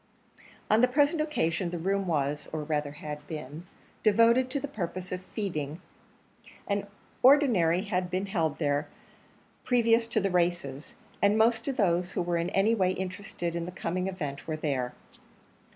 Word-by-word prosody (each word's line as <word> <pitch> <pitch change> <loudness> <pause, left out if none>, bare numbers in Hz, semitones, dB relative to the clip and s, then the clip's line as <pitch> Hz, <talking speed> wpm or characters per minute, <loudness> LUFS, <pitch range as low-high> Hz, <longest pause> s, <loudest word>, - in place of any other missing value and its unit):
On 215 +2 +4
the 250 - +6
present 290 +5 +2
occasion 180 - 0
the 175 - -4
room 195 +3 0
was, 145 -3 -1
or 155 -1 -3
rather 150 -1 -1
had 150 0 -7
been, 155 +2 -7 0.3
devoted 230 +4 +4
to 280 +2 -1
the 285 - -4
purpose 185 -6 -5
of 180 0 -3
feeding; 170 -7 -4 0.9
an 200 0 -1 0.3
ordinary 235 - +5
had 180 -3 -1
been 185 +2 -1
held 165 -6 -1
here 145 -1 0 0.8
previous 230 -2 +3
to 230 -1 +1
the 195 -2 0
races; 170 -6 -1 0.3
and 200 +1 +4
most 225 +2 +3
of 275 -1 -2
those 180 -4 +1
who - - 0
were 175 0 0
in 170 +1 -1
any 195 +4 +3
way 185 -4 +2
interested 185 -2 -4
in 170 0 -2
the - - -5
coming 185 +1 -2
event 150 -7 -5
were 155 -1 -2
there. 135 -5 -2
180 Hz, 165 wpm, -29 LUFS, 160-220 Hz, 0.9 s, the